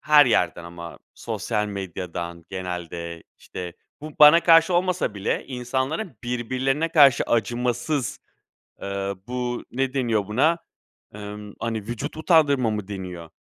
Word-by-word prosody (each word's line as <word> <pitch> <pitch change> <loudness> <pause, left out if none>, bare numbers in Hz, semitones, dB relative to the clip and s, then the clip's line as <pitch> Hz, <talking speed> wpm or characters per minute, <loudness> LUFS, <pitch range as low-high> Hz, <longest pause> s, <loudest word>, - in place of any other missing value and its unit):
Her 150 -2 +6
yerden 90 -7 +1
ama 85 0 -9 0.2
sosyal 105 0 -2
medyadan 90 -4 -6
genelde, 85 -3 -5 0.2
işte, 90 -1 -7 0.3
bu 155 +1 -8
bana 150 +3 +9
karşı 165 +1 +6
olmasa 180 - +1
bile 100 0 -2
insanların 130 - -3
birbirlerine 130 +5 -1
karşı 145 -6 +6
acımasız, 120 +3 -1 0.6
eee, 100 0 -3
bu 125 -1 -3
ne 130 +1 -1
deniyor 115 -7 0
buna? 140 +10 +2 0.6
Emm, 105 0 -8
hani, 115 -2 -2
vücut 120 +8 -5
utandırma 145 -7 +3
mı 105 -3 -3
deniyor? 90 -4 -7
120 Hz, 120 wpm, -24 LUFS, 95-140 Hz, 0.6 s, bana